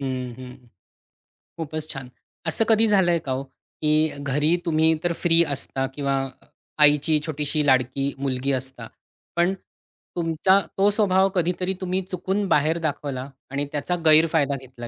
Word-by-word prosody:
हं, 130 -2 -3
हं. 125 -1 -12 0.9
खूपच 155 -1 -5
छान. 135 -2 -8 0.4
असं 220 +8 +2
कधी 225 0 +5
झालंय 180 -5 +3
का 135 - -3
हो, 130 +1 -2 0.4
की 155 +1 +3
घरी 145 +4 +1
तुम्ही 160 0 +3
तर 175 - +1
फ्री 170 0 +4
असता 135 -2 -2
किंवा 140 -1 -1 0.7
आईची 150 +1 +4
छोटीशी 150 -1 -1
लाडकी 135 +1 +1
मुलगी 135 0 -1
असता, 130 0 -4 0.5
पण 175 +2 +2 0.6
तुमचा 170 +3 +3 0.2
तो 200 +1 +4
स्वभाव 195 -2 +3
कधीतरी 180 +2 0
तुम्ही 185 +1 -1
चुकून 190 +3 -1
बाहेर 160 0 +2
दाखवला 140 -4 -3 0.2
आणि 140 +1 -1
त्याचा 150 +4 -2
गैरफायदा 155 -2 +4
घेतला 125 -2 -10
155 Hz, 135 wpm, -23 LUFS, 135-175 Hz, 0.9 s, कधी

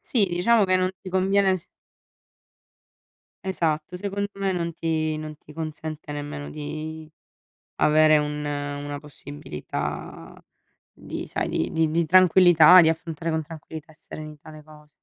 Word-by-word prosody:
Sì, 215 -6 +1
diciamo 200 +5 +3
che 185 0 +3
non 185 0 +1
ti 190 - -8
conviene 190 +1 +2
s 170 - -12 1.8
Esatto, 165 -1 -1
secondo 200 +1 -3
me 195 -1 -1
non 170 -1 -2
ti 155 -1 -1
non 155 0 -7
ti 150 - -16
consente 155 -1 -6
nemmeno 145 0 -6
di 155 +1 -6 0.7
avere 155 0 +5
un 150 0 -3
una 145 0 -4
possibilità 75 - -7 0.6
di - - -7
sai - - -2
di 80 - -1
di 160 -1 +1
di 165 +2 +1
tranquillità, 180 0 +7
di 160 - +5
affrontare 165 0 -3
con 160 0 -1
tranquillità 160 0 -10
e - - -22
serenità 155 -1 -10
le 155 -1 -12
cose. 150 -1 -17
155 Hz, 140 wpm, -24 LUFS, 150-180 Hz, 1.8 s, tranquillità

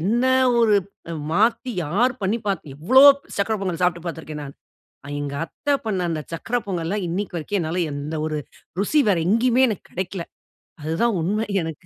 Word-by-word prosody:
என்ன 230 +9 +1 0.3
ஒரு 225 -3 +4 0.4
அ - - -3 0.2
மாத்தி 230 +6 +2
யார் 225 +12 +2
பண்ணிபாத்து 195 -7 -2
எவ்வளோ 255 - +5 0.3
சர்க்கரை 215 +2 +1
பொங்கல் 185 -3 -3
சாப்பிட்டு 175 -1 +1
பார்த்து 165 -1 -5
இருக்கேன், 150 -1 -7
நான். 140 0 -10 0.6
எங்க 140 -1 -4
அத்தை 285 - -3
பண்ணி 195 -5 -1
அந்த 160 -2 -2
சக்கரை 225 +9 -1
பொங்கல்லாம் 185 +1 -2
இன்னைக்கு 180 +1 -3
வரைக்கும் 185 +5 -2
என்னால 170 +3 -1
எந்த 145 +2 -4
ஒரு 155 -1 -2 0.4
ருசி 295 +10 +3
வேறு 180 -5 +3
எங்கேயுமே 245 +4 +4
எனக்கு 210 - -4
கிடைக்கல. 185 0 -3 0.6
அதுதான் 185 +8 +1
உண்மை 210 +6 0 0.2
எனக்கு. 160 -2 -7
190 Hz, 160 wpm, -23 LUFS, 165-220 Hz, 0.6 s, எவ்வளோ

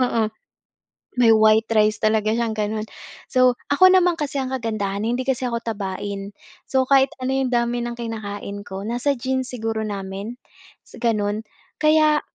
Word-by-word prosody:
oo. 230 -2 +1 1.0
May 230 -2 +6
white 220 0 +5
rice 215 -1 +3
talaga 215 0 +2
siyang 230 -2 0
ganun. 215 0 -2 0.4
So, 255 -1 +3
ako 370 +6 +6
naman 360 -1 +5
kasi 295 -3 -4
ang 265 -1 -2
kagandahan 215 -5 -2
hindi 240 +4 -1
kasi 265 -2 0
ako 235 - -1
tabain. 200 -2 -4 0.4
So, 265 -1 +2
kahit 270 0 +4
ano 260 +1 -2
yung 265 -1 0
dami 240 0 0
ng 240 0 -4
kinakain 205 -3 -5
ko, 195 0 -7
nasa 245 +4 0
genes 260 +1 -2
siguro 225 -2 -3
namin, 200 +2 -5 0.6
gano'n 215 -3 0 0.4
kaya 305 -1 +4
230 Hz, 150 wpm, -22 LUFS, 215-260 Hz, 1.0 s, May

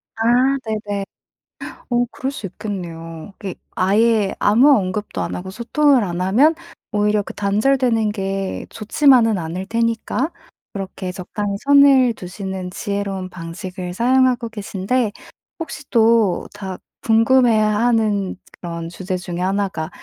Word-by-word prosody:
아 225 - -2 0.4
네네. 210 -3 -3 0.9
어 240 0 +3
그럴 265 - -3
수 220 - -6
있겠네요. 170 -3 -7
이게 195 -3 -5 0.2
아예 210 +1 +2
아무 240 +8 +5
언급도 200 +1 -3
안 - - -3
하고 190 +1 -6
소통을 255 +5 +2
안 175 -3 -3
하면 240 - +4 0.4
오히려 210 0 +1
그 - - -8
단절되는 225 +2 +1
게 195 -2 -3
좋지만은 225 -1 +3
않을 175 +3 -4
테니까 230 - -1 0.4
그렇게 190 -1 -5
적당히 200 +3 -4
선을 275 -3 +6
두시는 190 -1 -6
지혜로운 195 -1 -3
방식을 180 +1 -7
사용하고 250 +1 +2
계신데 210 +2 -2 0.5
혹시 300 -3 -6
또 225 -5 +3
다 190 -3 -6 0.3
궁금해하는 220 -3 +3 0.2
그런 170 -1 -5
주제 185 +2 -4
중의 175 -1 -5
1 195 +2 +1
가 160 -4 -5
205 Hz, 265 characters per minute, -20 LUFS, 185-230 Hz, 0.9 s, 선을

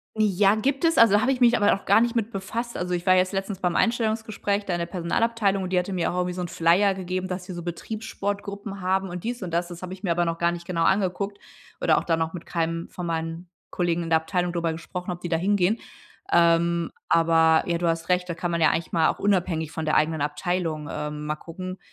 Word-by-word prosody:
Ja, 205 -2 +3
gibt 270 +8 0
es, 330 0 +3
also, 215 -2 +6
habe 260 - +2
ich 260 -1 -2
mich 240 0 +6
aber 205 - +4
noch 195 - -1
gar 200 +3 +5
nicht 235 +1 +1
mit 230 -2 0
befasst. 235 +3 -4
Also, 180 0 -2
ich 175 -1 -1
war 185 - +6
jetzt 185 +1 +2
letztens 195 0 -3
beim 180 -2 0
Einstellungsgespräch 220 -3 0
da 185 - -2
in 175 - -1
der 170 - -1
Personalabteilung, 195 +3 0
und 185 - -5
die 180 - +4
hatte 180 +2 -3
mir 180 -3 0
auch 180 - -4
irgendwie 180 0 0
so 180 - -3
'n - - -3
Flyer 175 +5 +3
gegeben, 185 0 -3
dass 180 0 -5
sie 185 - -7
so 175 -1 -6
Betriebssportgruppen 200 +1 -5
haben 190 +1 0
und 175 0 -6
dies 240 +1 -3
und 180 -3 -5
das. 175 +1 -1
Das 175 -1 -9
habe 185 0 -6
ich 190 +2 -12
mir 180 - 0
aber 175 +1 +2
noch 165 0 -2
gar 170 0 +2
nicht 170 0 -7
genau 170 -2 0
angeguckt 200 +2 0 0.4
oder - - +4
auch - - 0
da 165 - +1
noch 160 0 -2
mit 175 - -7
keinem 165 0 -2
von 180 -1 -6
meinen 165 +1 -4 0.2
Kollegen 175 -1 0
in 165 - -5
der 160 - +6
Abteilung 175 +1 -1
drüber 170 -1 0
gesprochen, 175 +3 -6
ob 175 - -5
die 175 - -4
da 165 - +2
hingehen. 200 +4 +2 0.5
Ähm, 170 0 +3 0.2
aber, 165 -1 +4
ja, 170 -1 -1
du 175 - 0
hast 165 +1 -1
recht, 180 0 +1
da 170 - -2
kann 175 +1 -3
man 170 0 -1
ja 160 - +6
eigentlich 165 - -2
mal 165 -2 +3
auch - - -2
unabhängig 175 -6 0
von 160 - -4
der 155 - +1
eigenen 155 0 +2
Abteilung, 155 +1 -2
ähm, 150 0 -4
mal 150 0 -1
gucken, 185 +4 -8
180 Hz, 250 wpm, -25 LUFS, 170-200 Hz, 0.5 s, also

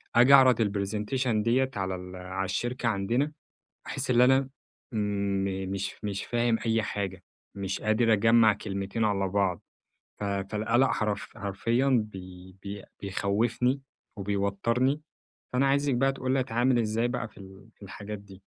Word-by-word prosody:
أجي 125 +4 +7
أعرض 130 -3 +7
ال 105 -3 +2
Presentation 105 +6 -2 0.2
دِيَّة 130 +3 +2
على 95 -2 -2
ال 90 0 -8
على 95 +1 -4
الشركة 120 +6 -2
عندنا، 115 +8 0 0.6
أحس - - -3
اللي 125 0 +6
أنا 130 +1 +4 0.4
م 100 -3 -1
مش 100 0 -3
مش 100 -1 -3
فاهم 120 -1 +1
أي 115 0 +2
حاجة. 95 -3 -4 0.3
مش 95 -1 -3
قادر 110 +2 +3
أجمع 115 +1 +5
كلمتين 100 +3 -3
على 100 -2 +1
بعض. 95 -3 0 0.6
ف - - -2
فالقلق 105 +5 +1
حرف 105 0 -2
حرفيًا 115 +6 0 0.2
بي 95 0 -11
بي 100 0 -6 0.2
بيخوفني، 110 +7 0 0.4
وبيوترني، 105 +7 0 0.5
فأنا 130 +2 +2
عايزك 140 0 +2
بقى 135 +2 +2
تقول 130 -1 -2
لي 135 - +2
اتعامل 125 0 +2
إزاي 115 +1 +1
بقى 120 -2 -3
في - - -18
ال 95 +1 -13
في - - -23
الحاجات 100 +2 -7
دي؟ 100 -1 -15
105 Hz, 150 wpm, -28 LUFS, 100-120 Hz, 0.6 s, أجي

